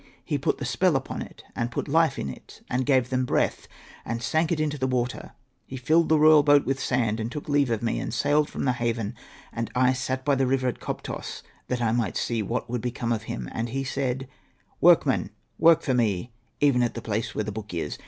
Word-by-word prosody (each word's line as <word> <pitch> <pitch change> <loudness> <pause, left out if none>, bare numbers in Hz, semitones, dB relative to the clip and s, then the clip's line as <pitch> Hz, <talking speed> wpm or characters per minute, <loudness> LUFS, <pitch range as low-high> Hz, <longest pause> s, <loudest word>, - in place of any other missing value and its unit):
He - - -1
put - - 0
the - - -4
spell - - +2
upon - - -3
it, - - -10
and 120 0 -1
put 120 - -4
life 160 +2 +3
in - - -3
it, 65 - -10
and 125 0 0
gave 130 -3 +3
them 130 0 +1
breath, 125 - 0 0.4
and 115 +1 -3
sank 160 +6 +1
it 165 - 0
in 155 -1 +1
the 135 -3 -2
water. 125 -1 -2 0.3
He 130 - -6
filled 155 +7 +2
the 160 - +5
royal 155 0 +7
boat 145 0 +4
with 135 0 -1
sand, 115 -5 0
and 110 +2 -3
took 150 - -6
leave 145 -3 +2
of 115 -1 -1
me, 115 - 0
and - - -4
sailed 145 +1 +2
from - - -4
the 130 - +3
haven: 115 -3 -2 0.4
and 115 -1 -3
I 130 +1 +4
sat 130 +1 -3
by 145 - +3
the 135 -1 +2
river 130 0 +1
at 125 - -2
Koptos - - -6 0.2
that 125 -1 -1
I 115 - +2
might 120 -1 0
see 115 -2 -1
what 115 +4 -3
would 120 -1 -3
become 120 -1 -2
of 110 -1 -1
him. - - -4
And 115 +1 -3
he 135 +3 -2
said, 135 -1 -2 0.3
' - - -38
Workmen, - - +4 0.3
work 165 -1 +6
for 130 - 0
me, 115 -2 0 0.3
even 140 -4 +4
at 120 - 0
the 115 - -4
place 110 0 -2
where 110 - 0
the 105 - -4
book 105 -1 -7
is.' 85 -2 -4
125 Hz, 235 wpm, -26 LUFS, 115-140 Hz, 0.4 s, royal